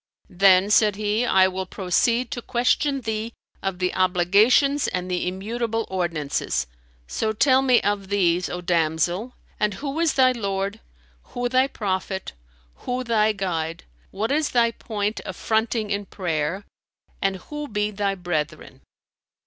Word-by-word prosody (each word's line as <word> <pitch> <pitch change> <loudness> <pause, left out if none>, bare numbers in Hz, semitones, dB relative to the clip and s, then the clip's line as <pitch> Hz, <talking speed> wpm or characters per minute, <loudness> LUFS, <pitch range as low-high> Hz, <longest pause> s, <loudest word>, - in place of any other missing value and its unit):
"Then," 190 +2 +5
said 210 -1 +4
he, 215 +3 0
"I 190 0 +5
will 190 0 -4
proceed 230 +7 0
to 250 -4 -4
question 260 +4 +1
thee 220 0 -3 0.3
of 195 -2 -2
the 180 0 -1
obligations 200 +10 +3
and 180 0 -3
the 180 0 -1
immutable 225 +4 -2
ordinances: 170 -6 -1 0.4
so 220 - -2
tell 260 +4 +4
me 255 -3 +4
of 205 -1 -1
these, 180 -3 +1
O 180 - -4
damsel, 175 +6 0 0.3
and 210 -2 +1
who 280 +5 -4
is 330 -3 +2
thy 255 -1 +5
Lord, 200 -2 -3 0.6
who 245 0 0
thy 260 +2 +3
prophet, 190 -5 -3 0.4
who 250 0 -3
thy 220 -3 +2
Guide, 170 -5 -3 0.3
what 220 +5 -2
is 300 +1 +1
thy 235 -1 +3
point 210 -2 -3
of - - -7
fronting 220 -1 0
in 200 0 -2
prayer, 170 +1 -2 0.6
and 195 0 +1
who 295 +10 -7
be 210 -2 -1
thy 200 -1 -1
brethren? 155 -6 -4
205 Hz, 145 wpm, -23 LUFS, 185-235 Hz, 0.6 s, Then